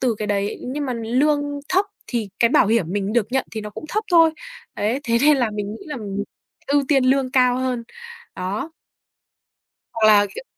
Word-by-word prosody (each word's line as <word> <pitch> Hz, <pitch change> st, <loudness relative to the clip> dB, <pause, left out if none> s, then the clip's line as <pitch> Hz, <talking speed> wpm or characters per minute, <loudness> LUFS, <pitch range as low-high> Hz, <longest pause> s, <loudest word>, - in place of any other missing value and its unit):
từ 245 Hz, -3 st, +1 dB
cái 215 Hz, -, -3 dB
đấy 200 Hz, 0 st, -1 dB
nhưng 290 Hz, +2 st, -3 dB
mà 255 Hz, -, -2 dB
lương 255 Hz, +6 st, +1 dB, 0.3 s
thấp 380 Hz, +2 st, +2 dB, 0.2 s
thì 230 Hz, -4 st, -3 dB
cái 235 Hz, -, +4 dB
bảo 240 Hz, -, +4 dB
hiểm 225 Hz, -3 st, +2 dB
mình 205 Hz, +1 st, -1 dB
được 235 Hz, -4 st, +2 dB
nhận 265 Hz, -, +1 dB
thì 220 Hz, -, -4 dB
nó 210 Hz, 0 st, -7 dB
cũng 310 Hz, -, -9 dB
thấp 430 Hz, +6 st, -1 dB
thôi, 330 Hz, -2 st, +6 dB, 0.4 s
ấy. 225 Hz, +6 st, -1 dB
Thế 235 Hz, -1 st, +2 dB
nên 295 Hz, 0 st, +5 dB
là 240 Hz, -4 st, +1 dB
mình 210 Hz, -1 st, -4 dB
nghĩ -, -, -10 dB
là 295 Hz, -, -5 dB, 0.7 s
ưu 285 Hz, 0 st, +2 dB
tiên 270 Hz, -3 st, +3 dB
lương 260 Hz, 0 st, +2 dB
cao 250 Hz, -1 st, +3 dB
hơn, 255 Hz, -2 st, -2 dB, 0.5 s
đó. 195 Hz, -, -3 dB, 1.2 s
Hoặc 220 Hz, -1 st, +2 dB
là, 205 Hz, -1 st, +6 dB
kiểu -, -, -7 dB
245 Hz, 200 wpm, -21 LUFS, 215-275 Hz, 1.2 s, thôi